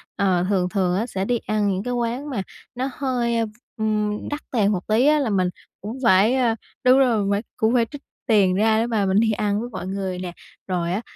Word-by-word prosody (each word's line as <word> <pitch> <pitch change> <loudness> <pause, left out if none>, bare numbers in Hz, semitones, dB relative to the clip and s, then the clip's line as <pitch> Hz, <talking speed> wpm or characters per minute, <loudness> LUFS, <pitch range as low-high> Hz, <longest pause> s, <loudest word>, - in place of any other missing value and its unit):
ờ, 185 -3 +1
thường 185 -3 +1
thường 185 -3 0
á 220 - 0
sẽ 190 -3 -3
đi 240 +2 +1
ăn 215 -2 -1
những 190 +1 -1
cái 245 - -2
quán 245 +4 -2
mà 240 -8 -2 0.3
nó 260 +2 -2
hơi, 240 -4 0
v - - -7 0.3
ừm, 215 -1 -1
đắt 295 +1 -4
tiền 210 -4 +2
một 185 -3 -3
tí 225 +5 +3
á 300 0 +5
là 270 - 0
mình 185 -3 +1 0.3
cũng 215 +6 -6
phải, 200 +4 +5
à 240 -3 +2 0.3
đúng 255 +1 +6
rồi 245 -4 +3
mình 200 - 0
phải 200 0 +1 0.2
cũng 220 +2 +2
phải 235 -2 +3
trích 290 -1 -8 0.3
tiền 200 -6 +4
ra 220 +2 +3
để 230 - +1
mà 220 -4 +1
mình 195 +2 +3
đi 225 -1 +3
ăn 205 -1 0
với 240 +2 -5
mọi 185 - -6
người 190 -1 -3
nè. 180 -1 -5 0.4
Rồi 175 -2 -1
á, 205 - -1
215 Hz, 240 wpm, -23 LUFS, 195-240 Hz, 0.4 s, đúng